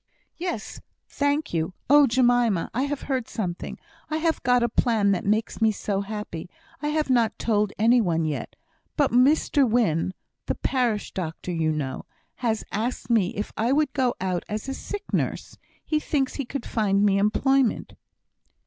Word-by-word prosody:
"Yes; 340 - -4 0.3
thank 285 - -1
you. 165 +2 -1
Oh! 290 +1 +7
Jemima, 240 -6 +2
I 260 +4 0
have 285 0 -4
heard 260 -4 -2
something 180 -5 -4 0.3
I 310 - -1
have 320 0 0
got 245 0 +3
a - - +3
plan 225 -3 +2
that 185 - -1
makes 215 +2 0
me 220 -1 +5
so 200 -1 -2
happy! 200 -5 -6 0.3
I 295 - -1
have 300 -2 0
not 230 -3 +2
told 210 -3 +1
any 235 +3 +5
one 165 -5 0
yet. 155 -2 -4 0.4
But 285 -2 +3
Mr 270 +1 +4
Wynne 185 -6 +1 0.3
(the - - 0
parish 240 -6 0
doctor, 175 0 -4
you 160 -2 0
know) 140 -4 -3 0.3
has 225 -3 -1
asked 225 +1 -2
me 210 -6 +2
if 205 - -4
I 230 +3 +1
would 290 -1 +2
go 255 -3 +1
out 185 -2 -1
as 215 +3 -4
a 270 - -2
sick 410 +8 -6
nurse - - -2 0.3
he 310 - +1
thinks 275 -3 -1
he 280 - -3
could 265 +1 -5
find 205 -2 +1
me 195 -1 +3
employment." 260 +4 +2
230 Hz, 170 wpm, -25 LUFS, 200-270 Hz, 0.4 s, Oh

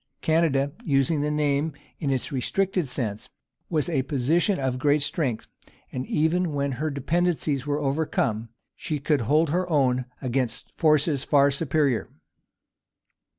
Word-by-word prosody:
Canada 155 -4 +2
using 140 +1 +2
the 150 - 0
name 150 0 0 0.3
in 145 - -1
its 130 -2 -1
restricted 180 +6 0
sense 120 -2 -4 0.4
was 155 -4 0
a 155 -6 +1
position 155 - +1
of 130 -2 -1
great 145 +1 +3
strength; 135 -7 -1 0.5
and 130 0 -4
even 160 +2 +1
when 140 -1 -1
her 150 +5 -2
dependencies 150 -1 0
were 145 0 0
overcome, 135 -6 -1 0.3
she 155 - -3
could 145 -1 +1
hold 150 +7 +2
her 180 +2 0
own 130 -5 +2
against 130 -2 -2
forces 155 -3 +2
far 140 -1 +4
superior. 140 -3 0
145 Hz, 135 wpm, -25 LUFS, 135-160 Hz, 0.5 s, far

